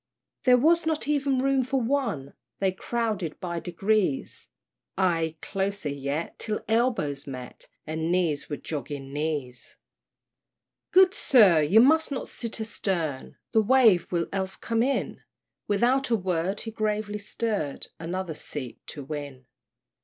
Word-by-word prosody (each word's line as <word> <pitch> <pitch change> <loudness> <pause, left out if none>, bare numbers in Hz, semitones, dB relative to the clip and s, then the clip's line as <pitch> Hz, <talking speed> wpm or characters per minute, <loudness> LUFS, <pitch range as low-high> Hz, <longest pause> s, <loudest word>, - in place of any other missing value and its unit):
There 250 -1 +7
was 325 +5 +3
not 315 -2 0
even 280 -3 +1
room 270 -1 +3
for 265 +2 0
one! 230 - -1 0.2
They 195 -1 +1
crowded 210 -4 -2
by 170 -2 -3
degrees 185 -2 -1 0.5
Ay 165 -4 +1
closer 195 -4 -2
yet, 140 +3 -3
till 215 -1 -3
elbows 220 - 0
met, 130 -2 -8 0.2
And 160 +2 -2
knees 170 -5 0
were 145 - -3
jogging 140 -1 -6
knees. 145 -5 -4 1.1
"Good 375 0 +6
sir, 210 - +5
you 190 +10 +6
must 315 +4 +4
not 270 - -3
sit 230 -1 -5
a 220 - -2
stern, 170 -10 -3 0.2
The 220 - +4
wave 225 -5 +4
will 170 -2 +1
else 190 -1 -2
come 230 -1 -1
in!" 270 +3 -1 0.5
Without 245 +6 +2
a 235 - +4
word 185 0 -1
he 225 - -5
gravely 210 -1 -2
stirred, 205 -8 -3
Another 175 +1 -3
seat 140 -4 -7
to 145 - -7
win. 140 -3 -7
195 Hz, 140 wpm, -27 LUFS, 155-235 Hz, 1.1 s, There